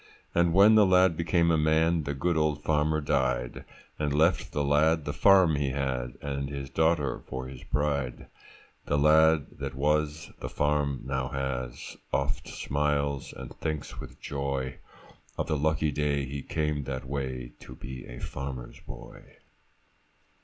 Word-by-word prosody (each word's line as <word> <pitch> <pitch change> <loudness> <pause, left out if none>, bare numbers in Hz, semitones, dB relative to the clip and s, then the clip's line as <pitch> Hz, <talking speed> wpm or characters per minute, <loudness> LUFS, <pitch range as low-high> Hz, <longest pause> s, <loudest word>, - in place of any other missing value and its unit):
And 85 0 +3
when 100 +5 +7
the 110 -1 +7
lad 90 -2 +5
became 85 +1 +2
a 80 - +3
man, 80 +1 +2
The 70 0 -2
good 85 +5 0
old 75 -2 0
farmer 75 0 +1
died, 65 -4 -1 0.3
And 75 -1 0
left 80 +5 +2
the 75 - -1
lad 75 +2 +3
the - - -2
farm 95 -6 +5
he 70 -1 0
had, 65 -2 -2
And 70 -1 -3
his 70 -1 -6
daughter 80 -3 +1
for 65 0 -5
his 65 -1 -9
bride. 70 -4 -1 0.6
The 75 - +1
lad 80 +1 +5
that 70 -2 -4
was, 75 +2 0
the - - -5
farm 75 -2 0
now 65 -1 -1
has, 65 -2 -4
Oft - - -1
smiles, 70 -1 -1
and - - -9
thinks 75 -2 -4
with - - -10
joy 70 -2 -3 0.6
Of - - -1
the 75 - -1
lucky 75 +1 +1
day 70 -1 0
he 70 +2 -5
came 75 -1 -2
that 65 -1 -4
way, 65 -3 -4
To 65 - -11
be 65 0 -8
a - - -9
farmer's 65 -2 -6
boy. - - -11
70 Hz, 155 wpm, -28 LUFS, 65-80 Hz, 0.6 s, when